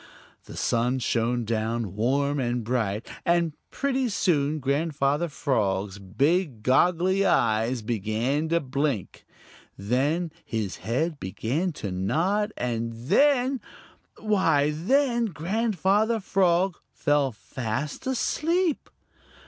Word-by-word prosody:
The - - -10
sun 120 +2 +1
shone 120 -1 0
down 110 -2 -2
warm 140 +6 +1
and 120 -2 -1
bright, 110 -2 -1 0.2
and 170 -2 +2 0.2
pretty 265 -2 -1
soon 155 -7 +1
Grandfather 145 +2 0
Frog's 100 -8 -1
big 135 - 0
goggly 180 +8 +3
eyes 115 - +2
began 115 +8 -1
to 170 +1 +3
blink. 135 - -3 0.5
Then 140 - 0
his 110 -4 -3
head 140 - -2
began 130 - -2
to 100 -8 -5
nod, 165 - 0
and 115 -1 -2
then 250 - +2 0.6
why, 165 -9 +2
then 240 - +2
Grandfather 210 +4 +1
Frog 185 -2 +2
fell 145 -2 +1
fast 115 - -5
asleep. 320 +6 0
145 Hz, 100 wpm, -26 LUFS, 115-185 Hz, 0.6 s, goggly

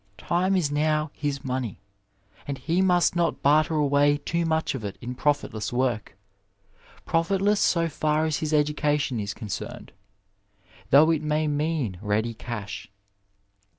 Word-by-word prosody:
Time 180 - +1
is 165 -6 +1
now 150 0 +1
his 145 -2 -3
money, 125 -5 -3 0.7
and 140 -1 -3
he 170 +6 0
must 180 -2 +3
not 170 -1 0
barter 155 +3 +4
away 145 0 +3
too 170 +3 -2
much 160 0 0
of 130 -5 -5
it 100 -2 -5
in 125 +1 -5
profitless 130 -5 -1
Work 120 -5 -1 0.4
— 100 0 -28
profitless 195 +5 +1
so 170 -1 +2
&r 155 +1 +2
as 155 -2 0
his 155 -1 -3
education 150 -3 +1
is 100 -1 -4
concerned, 105 -5 -6 1.0
though 155 +4 +6
it 160 -2 +1
may 155 0 0
mean 145 - -1
ready 110 +2 0
cash. 110 -2 -7
150 Hz, 145 wpm, -25 LUFS, 125-160 Hz, 1.0 s, though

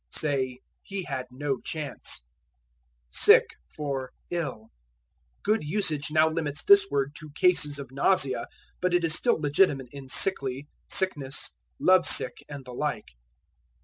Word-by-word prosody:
Say, 130 -4 -1 0.2
He 195 -1 -5
had 130 -5 -5
no 135 +1 -3
chance. 145 - -5 0.9
Sick - - +6 0.2
for 135 - -5 0.2
Ill. 150 -11 -4 0.7
Good 215 -2 +1
usage 155 -3 0
now 155 +1 +4
limits 160 -1 -3
this 200 -1 +6
word 140 0 -1
to 155 - -11
cases 150 -5 +3
of 135 -3 -8
nausea, 135 -1 +1 0.3
but 180 -1 +1
it 175 - +2
is 165 -2 +2
still 235 +2 +2
legitimate 145 -3 +2
in 140 -1 -10
sickly, 135 -3 0 0.2
sickness, 145 -8 0 0.3
love 185 -1 +4
sick, - - +2
and 140 -3 -8
the 125 - -9
like. 150 +4 -3
145 Hz, 135 wpm, -27 LUFS, 135-175 Hz, 0.9 s, Sick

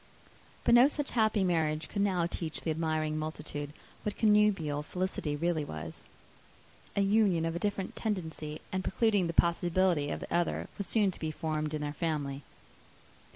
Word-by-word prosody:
But - - +4
no 240 +3 +8
such 290 -1 -2
happy 220 -3 +2
marriage 160 -3 +1
could 200 - -2
now 185 -4 +2
teach 165 -2 -3
the 160 - -1
admiring 155 -1 -1
multitude 145 -2 -5 0.3
what 210 - -3
connubial 210 -9 +3
felicity 180 -2 -2
really 165 0 0
was. 80 - -6 0.9
An 200 -1 +2
union 200 -7 +3
of 165 0 -2
a - - -2
different 200 -1 -2
tendency, 160 -7 -3
and 185 0 -1
precluding 205 -3 +2
the 165 - -3
possibility 170 -2 +2
of - - -3
the - - -6
other, 175 0 0
was 200 - -2
soon 210 -4 +2
to - - -9
be 160 - -2
formed 155 -1 -2
in 150 - -3
their 145 0 -3
family. 145 -4 -2
170 Hz, 165 wpm, -31 LUFS, 155-200 Hz, 0.9 s, no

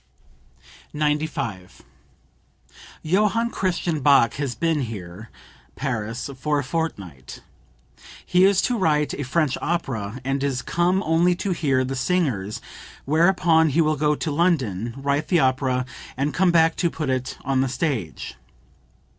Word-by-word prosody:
95. 150 -10 -2 1.2
"Johann 210 +7 +1
Christian 175 -4 -1
Bach 140 -4 +5
has 140 -4 -3
been 160 +4 0
here 105 -3 -7 0.5
(Paris) 115 -3 -3
for 150 +2 0
a 145 - 0
fortnight. 100 - -5 0.8
He 180 +1 +3
is 195 -1 +4
to 245 -3 0
write 150 -4 +1
a - - -4
French 140 +1 0
opera, 125 -9 -2
and 135 +1 -1
is 135 -3 -1
come 175 +4 +1
only 170 +3 +3
to 190 +2 -3
hear 140 -7 +1
the 130 +1 -3
singers, 125 - -1 0.4
whereupon 160 +1 +3
he 160 +4 +2
will 155 -1 +2
go 150 +1 +1
to 155 - -3
London, 130 - 0
write 140 +2 -1
the 175 - +3
opera, 130 -2 +1 0.3
and 140 +2 -1
come 185 -1 +3
back 165 -1 +4
to 170 - +1
put 150 -5 -3
it 130 0 -3
on 135 0 +1
the 135 - 0
stage. 125 - -3
145 Hz, 140 wpm, -23 LUFS, 130-165 Hz, 1.2 s, Bach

